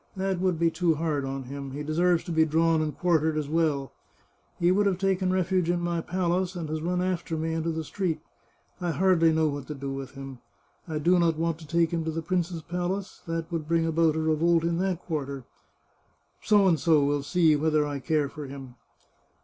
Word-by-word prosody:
That 190 -1 -1
would 185 -2 +1
be 165 0 +2
too 170 -2 +1
hard 150 -3 -1
on 135 0 -4
him; 135 +1 -7
he 145 +2 -4
deserves 170 +3 +2
to - - -6
be 160 -1 +4
drawn 160 +1 +2
and 155 -1 -3
quartered 160 -3 +2
as 150 -2 -2
well! 150 -3 0 0.7
He 175 +1 +3
would 200 +2 +3
have 190 -2 +1
taken 190 -1 +1
refuge 185 -1 +1
in 175 0 +1
my 170 -1 -1
palace, 180 +1 -1
and 170 -3 -4
has 155 0 -3
run 180 +2 0
after 175 -3 -2
me 160 +1 -2
into 165 0 -1
the 160 0 -2
street. 165 -1 -2 0.6
I 175 -2 -2
hardly 175 -3 +4
know 160 0 +2
what 145 -2 -4
to 150 - -5
do 140 0 -5
with 135 -1 -6
him.... 135 -2 -8 0.5
I 160 -2 -3
do 175 +4 +3
not 165 -2 +2
want 165 -1 -1
to 160 - -12
take 165 +1 +2
him 165 -1 -1
to 160 - -1
the 165 +1 -4
prince's 175 -1 -2
palace; 180 +3 -4
that 165 0 -3
would 160 -3 -3
bring 165 0 +2
about 165 -1 +2
a - - 0
revolt 160 +1 +2
in 170 0 0
that 185 -2 -1
quarter. 140 -5 -4 1.0
F - - -11 0.4
will 145 -3 +4
see 160 +1 +3
whether 155 0 +2
I 145 -1 -3
care 150 +1 0
for 150 0 -8
him. 135 -2 -9
165 Hz, 210 wpm, -27 LUFS, 150-175 Hz, 1.0 s, be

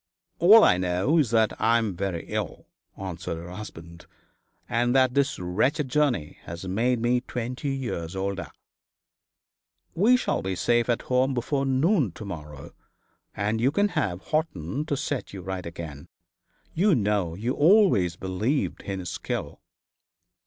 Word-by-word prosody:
'All 210 +6 +8
I 90 - +5
know 90 - +1
is 140 -7 +2
that 110 -1 +3
I 115 +1 +4
am 110 -5 -1
very 90 -2 -3
ill,' - - -4 0.3
answered 90 -3 -5
her 85 +2 -8
husband, 85 -4 -10 0.6
'and 120 +1 +1
that 130 -1 +4
this 140 0 +1
wretched 120 - 0
journey 130 - 0
has 85 +3 -7
made 115 +6 +1
me 120 +2 +1
twenty 125 +3 -4
years 95 -10 -4
older.' 95 0 -3 1.4
'We 225 +8 +4
shall - - -1
be 95 0 -2
safe 120 +5 +1
at 120 - +1
home 130 +1 +1
before 135 +3 -1
noon 135 - +2
to 105 - -9
morrow, 75 -7 -8 0.6
and 105 +2 -1
you 125 - +4
can 205 +8 +2
have 105 - -2
Horton 150 - -2
to 145 - -1
set 135 -4 -3
you 95 -2 -7
right 95 -2 -4
again. 80 -4 -8 0.7
You 185 +1 +3
know 100 -7 0
you 115 +7 -2
always 145 - +4
believed 95 - -2
in 95 -1 -4
his 90 -1 -5
skill.' - - -5
115 Hz, 150 wpm, -26 LUFS, 90-135 Hz, 1.4 s, All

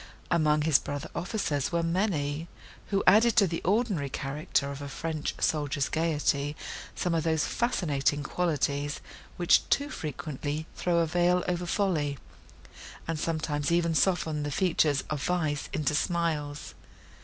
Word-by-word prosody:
Among 155 -3 +3
his 155 -3 +5
brother 145 -1 -5
officers 170 - -1
were 170 -1 +1
many, 165 -4 0 0.4
who 195 -1 0
added 220 +5 +6
to 215 -4 +6
the 165 -2 -3
ordinary 195 - +1
character 140 +1 -1
of 140 0 -7
a 140 - -5
French 155 +1 -3
soldier's 145 -3 0
gaiety 150 -3 0 0.4
some 175 - -1
of 165 -2 +1
those 160 -1 +1
fascinating 150 - 0
qualities, 145 -3 -1 0.4
which 175 -1 +4
too 285 +1 +1
frequently 150 0 -4
throw 175 -1 +1
a 170 - +4
veil 175 +2 +2
over 175 0 -1
folly, 160 -8 0 0.9
and 165 -1 -2
sometimes 155 -2 -1
even 170 -1 +2
soften 160 -3 +1
the 145 - -2
features 150 -3 +2
of 150 -2 -2
vice 155 -5 -1
into 150 -2 0
smiles. 155 -3 -1
160 Hz, 140 wpm, -28 LUFS, 145-175 Hz, 0.9 s, added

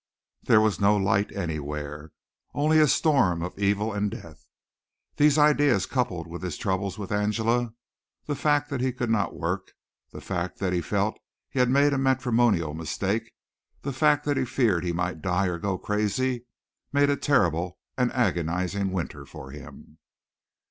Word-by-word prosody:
There 110 - +5
was 105 -5 +1
no 105 +1 +4
light 100 +1 +1
anywhere. 75 -3 -5 0.4
Only 155 +2 +3
a 155 - +6
storm 125 - +2
of 90 - -5
evil 100 +2 +1
and 105 0 0
death. 85 -7 -11 0.7
These 150 0 +5
ideas 145 -9 +4
coupled 95 -11 -2
with 85 0 -8
his 90 -5 -4
troubles 95 0 -2
with 100 -2 -6
Angela, 110 +3 0 0.5
the 150 - -2
fact 145 +1 +1
that 135 -3 -2
he 130 -1 0
could 120 -2 -2
not 105 -3 0
work, 90 +3 -3 0.4
the - - -9
fact 90 -1 -4
that 95 -2 -1
he 90 - +1
felt 70 - -1 0.3
he 135 - -2
had 125 -1 +4
made 140 +2 +4
a 135 - 0
matrimonial 120 - +2
mistake, 95 +7 -2 0.5
the 140 - -3
fact 150 +2 +3
that 145 -2 +1
he 130 - +2
feared 115 -9 +1
he 90 - -1
might 85 -1 -2
die 95 +1 +1
or 90 -2 -2
go 100 -1 -1
crazy, 115 +5 -1 0.4
made 145 0 +3
a - - +2
terrible 90 - +1 0.2
and 125 -2 +1
agonizing 90 -3 0
winter 80 -5 -4
for 70 -2 -11
him. 75 +2 -12
100 Hz, 165 wpm, -26 LUFS, 90-130 Hz, 0.7 s, a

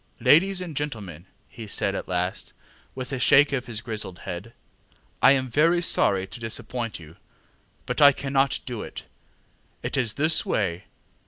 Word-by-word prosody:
ŌĆ£Ladies 185 +4 +4
and 170 -4 -6
gentlemen, 105 - -5
ŌĆØ 100 +1 -37
he 115 -2 -9
said 100 -1 +1
at - - -5
last, 90 +1 -3 0.4
with 130 +1 -6
a 130 - -2
shake 140 +3 +5
of 130 -2 -2
his 115 -2 -4
grizzled 110 -5 -5
head, 100 +7 -7 0.7
ŌĆ£I 135 - +7
am 130 -1 0
very 155 +8 +3
sorry 100 - +2
to 95 - -11
disappoint 115 0 -4
you, 80 -1 -14 0.7
but 125 +4 -2
I 140 -1 +9
cannot 135 0 0
do 120 -4 -5
it. - - -8 0.8
It - - -3
is 120 -5 0
this 155 +2 +3
way. 90 -4 -2
120 Hz, 165 wpm, -25 LUFS, 100-140 Hz, 0.8 s, I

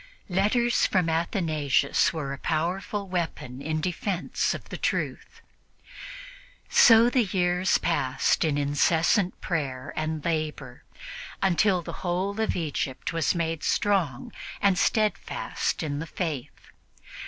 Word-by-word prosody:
Letters 215 +6 +2
from 180 -4 +1
Athanasius 160 - +1
were 145 -4 -4
a 140 - -7
powerful 185 +5 -2
weapon 160 -8 -4
in 155 +2 -2
defense 180 +2 -1
of - - -10
the - - -5
truth. - - -3 1.3
So 230 0 +7
the 245 -1 +2
years 180 -1 +1
passed 135 -6 +1
in 155 -3 +1
incessant 160 +6 +2
prayer 135 -7 -3
and 155 -1 -3
labor, 155 -6 -3 0.6
until 190 -1 +3
the - - -7
whole 190 +4 -1
of 220 - 0
Egypt 155 -2 -3
was 165 -3 -1 0.3
strong 175 -11 0 0.3
and 200 -2 +3
steadfast 215 -3 -1
in 145 -2 -3
the 165 - -5
Faith. 155 -6 -5
170 Hz, 115 wpm, -26 LUFS, 150-190 Hz, 1.3 s, So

